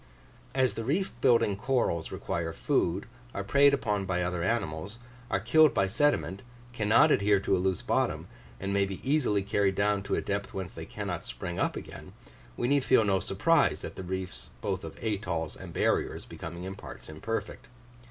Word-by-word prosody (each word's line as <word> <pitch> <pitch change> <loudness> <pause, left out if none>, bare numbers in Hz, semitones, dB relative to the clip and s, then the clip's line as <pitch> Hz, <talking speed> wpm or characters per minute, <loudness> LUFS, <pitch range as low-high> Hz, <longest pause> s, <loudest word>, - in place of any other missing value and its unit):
As 130 -2 +3
the 115 - -4
reef 170 - 0
building 115 -6 +4
corals 105 -7 0
require 80 -1 -3
food, 85 +3 0 0.3
are 100 - -2
preyed 140 +7 +5
upon 105 -8 0
by 90 -1 0
other 90 -1 -2
animals, 95 -1 -2 0.3
are 95 - +1
killed 140 +8 +5
by 95 - +3
sediment, 100 -2 +1 0.3
cannot 110 0 +4
adhere 100 0 +4
to 95 - +2
a - - 0
loose 95 -1 0
bottom, - - 0 0.3
and 100 +1 -2
may 100 0 +3
be 95 -1 -4
easily 125 -9 +2
carried 100 -1 +1
down 100 0 +2
to 100 - -1
a - - 0
depth 100 0 -3
whence 95 -1 -4
they - - -8
cannot - - -4
spring 90 0 -5
up - - +1
again, - - -9 0.4
we 120 - 0
need 140 0 +3
feel 130 -3 +5
no 95 -2 +3
surprise 145 - +2
at - - -7
the - - -6
reefs 95 0 -5
both - - -2
of - - -8
atolls 95 -7 -2
and - - -9
barriers - - 0
becoming 85 +2 -7
in 95 +1 -5
parts 100 - -10
imperfect. 80 +9 -5
100 Hz, 180 wpm, -29 LUFS, 95-120 Hz, 0.4 s, preyed